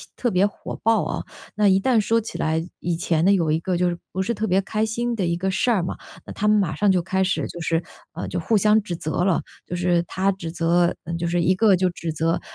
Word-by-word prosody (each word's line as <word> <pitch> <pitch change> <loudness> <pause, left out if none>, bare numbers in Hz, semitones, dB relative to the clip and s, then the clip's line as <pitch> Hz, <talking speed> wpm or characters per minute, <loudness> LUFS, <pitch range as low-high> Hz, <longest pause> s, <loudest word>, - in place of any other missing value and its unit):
特 240 - -1
别 185 +2 +3
火 205 - -8
爆 225 -2 +3
啊。 - - -3 0.3
那 210 0 +3
一 190 0 +5
旦 240 +2 +3
说 225 +2 +2
起 220 - -7
来， 160 +1 0 0.2
以 175 -1 -1
前 165 -1 0
呢， 200 - +5
有 165 -5 +1
一 160 - +2
个 180 +2 -2
就 180 0 +2
是 175 - -3 0.2
不 190 - -1
是 220 +5 -1
特 220 0 -2
别 190 0 +3
开 215 +2 -1
心 235 +2 -2
的 195 - -1
一 170 0 0
个 190 +3 -1
事 210 +6 +1
儿 195 -6 +2
嘛， 175 - -4 0.3
那 - - -8
她 210 - -1
们 210 0 +5
马 185 -6 +1
上 205 +6 +2
就 185 -2 +2
开 190 +2 -1
始 190 +1 0
就 175 - -8
是 165 0 0 0.3
嗯， - - -5
就 - - -2
互 225 - +1
相 210 +2 +4
指 175 -3 -5
责 160 +1 -2
了。 190 -4 +2 0.2
就 180 - -5
是 175 -1 +2
她 190 +3 0
指 180 -4 -6
责 170 +1 +2
嗯， 170 -1 -4
就 170 0 -2
是 175 +1 +1
一 185 +2 +3
个 205 0 +4
就 185 0 +1
指 170 -2 -5
责， 165 +2 0
185 Hz, 290 characters per minute, -23 LUFS, 170-205 Hz, 0.3 s, 一